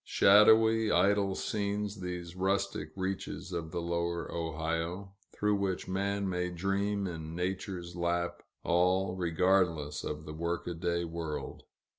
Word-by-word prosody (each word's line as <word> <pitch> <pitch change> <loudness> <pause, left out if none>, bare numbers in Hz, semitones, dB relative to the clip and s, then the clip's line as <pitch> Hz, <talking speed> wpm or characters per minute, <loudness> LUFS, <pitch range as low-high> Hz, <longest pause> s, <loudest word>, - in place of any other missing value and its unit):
Shadowy, 110 +2 +6
idle 100 -1 +3
scenes, 105 -1 -2
these 90 -1 -5
rustic 95 -4 0
reaches 95 0 -4
of 80 -2 -3
the 85 +2 -3
lower 85 0 -2
Ohio, 80 +4 -3 0.2
through 105 0 +1
which 95 -2 -2
man 100 +1 -1
may 90 -1 -1
dream 100 +3 -1
in 80 -3 -5
Nature's 90 -1 -3
lap, 85 0 -1 0.2
all 90 +2 +2
regardless 85 -4 +1
of 75 +1 -5
the 75 - -7
workaday 85 +1 -2
world. 80 -2 -5
90 Hz, 120 wpm, -31 LUFS, 85-100 Hz, 0.2 s, Shadowy